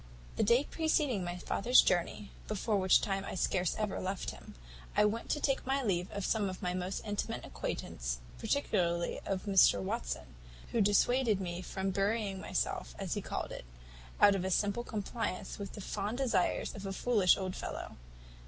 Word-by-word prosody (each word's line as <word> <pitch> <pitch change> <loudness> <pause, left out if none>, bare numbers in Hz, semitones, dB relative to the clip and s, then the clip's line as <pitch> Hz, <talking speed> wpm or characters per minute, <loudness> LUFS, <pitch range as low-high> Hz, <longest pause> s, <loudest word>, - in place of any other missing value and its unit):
"The - - 0
day 235 +5 +4
preceding 295 - +1
my 175 0 -4
father's 235 +7 +4
journey 180 +3 +2 0.2
(before 215 +1 0
which 190 -1 +5
time 195 -1 -1
I - - -5
scarce 180 -1 +1
ever 215 -2 -2
left 190 0 -3
him), - - -12 0.4
I - - +6
went 220 +2 -1
to 295 - +1
take 275 -2 +1
my 270 +1 0
leave 180 -5 0
of 200 -1 -3
some 210 -3 +1
of 185 - -6
my 180 -2 -2
most 185 +1 -3
intimate 205 -1 -3
acquaintance, - - -4 0.2
particularly 175 -9 0
of 190 -1 -1
Mr 195 - +5
Watson, 60 -8 -3 0.4
who 230 - +2
dissuaded 215 +2 +3
me 175 -1 -4
from 190 +1 -2
burying 200 0 0
myself, - - -2
as - - -3
he - - -2
called - - -4
it, - - -7 0.6
out 205 - +7
of 195 -2 -1
a 190 - -1
simple 205 +5 +1
compliance 215 -2 -4
with 200 -1 -6
the 210 - -7
fond 205 +4 -3
desires 235 -9 +1
of 200 -1 -6
a 195 - -3
foolish 205 -4 +4
old 185 -1 -3
fellow. - - -6
195 Hz, 180 wpm, -33 LUFS, 185-220 Hz, 0.6 s, out